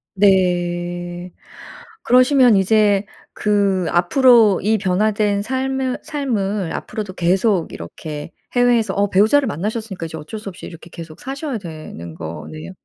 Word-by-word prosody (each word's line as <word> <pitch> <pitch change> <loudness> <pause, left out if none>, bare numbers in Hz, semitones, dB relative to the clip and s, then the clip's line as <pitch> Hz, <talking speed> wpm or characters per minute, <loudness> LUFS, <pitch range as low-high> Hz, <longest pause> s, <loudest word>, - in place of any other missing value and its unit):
네. 175 -2 0 0.7
그러시면 255 -2 +5
이제 205 0 +3 0.3
그 200 -3 +1
앞으로 220 +3 +5
이 220 +2 +2
변화된 205 +1 +1
삶은 260 +2 -2
삶을 210 - -2
앞으로도 205 -4 -5
계속 185 +1 +1
이렇게 150 - -8 0.2
해외에서 240 -4 +2
어 200 0 +1
배우자를 220 +9 +3
만나셨으니까 210 -1 -4
이제 160 - -7
어쩔 160 +8 -8
수 210 - -7
없이 180 - -11
이렇게 165 0 -12
계속 160 -2 -10
사셔야 270 0 -4
되는 155 - -9
거네요. 155 - -8
200 Hz, 295 characters per minute, -19 LUFS, 175-225 Hz, 0.7 s, 그러시면